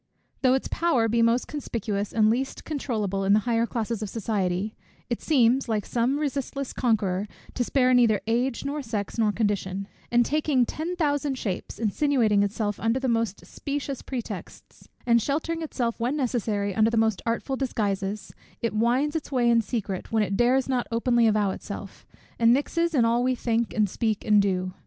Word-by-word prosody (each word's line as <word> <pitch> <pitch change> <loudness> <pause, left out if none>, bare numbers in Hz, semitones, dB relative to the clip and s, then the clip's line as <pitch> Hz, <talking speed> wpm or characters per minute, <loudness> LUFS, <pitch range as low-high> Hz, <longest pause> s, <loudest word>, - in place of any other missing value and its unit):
Though 255 -1 +4
its 265 - -2
power 295 -10 +1
be 230 +1 +2
most 230 +2 +2
conspicuous 215 -8 -3
and 215 -1 +3
least 265 +3 -2
controulable 215 -10 -2
in 195 +1 +4
the 215 - +4
higher 230 0 +1
classes 230 -2 -3
of 210 - -3
society, 205 -2 -2 0.4
it 235 - -1
seems, 255 -3 +3
like 215 -3 0
some 245 +4 0
resistless 275 -2 -3
conqueror, 210 -5 0 0.3
to 250 - 0
spare 255 0 +2
neither 235 -4 +4
age, 240 +4 0
nor 290 +2 -2
sex, 220 -3 -4
nor 215 -2 +3
condition; 200 -2 -1 0.2
and 240 0 +4
taking 290 -3 +2
ten 325 +8 -4
thousand 290 -4 0
shapes, 195 -7 -4
insinuating 225 -1 +2
itself 205 0 -1
under 225 +3 +1
the 265 - -2
most 230 -4 -1
specious 280 -2 -4
pretexts, 250 -4 -8 0.2
and 235 -1 +4
sheltering 320 +6 -1
itself 245 -7 -2
when 245 +6 0
necessary 220 -6 -1
under 220 +3 +3
the 230 - -1
most 220 -3 +2
artful 235 +4 -1
disguises, 205 -6 -2 0.3
it 230 - -1
winds 245 +7 +1
its 315 - -3
way 250 -3 +2
in 235 -1 +5
secret, 205 -4 -4
when 220 -1 +3
it 200 -1 -2
dares 250 +4 +3
not 255 -2 0
openly 235 0 +3
avow 210 -2 +2
itself, 200 0 -8 0.3
and 230 0 +5
mixes 335 +5 +1
in 240 -4 +4
all 235 +1 +2
we 255 0 +1
think, 235 -1 0
and 215 -2 +2
speak, 215 +2 -2
and 210 -1 +5
do. 185 -2 -1
230 Hz, 180 wpm, -26 LUFS, 210-260 Hz, 0.4 s, in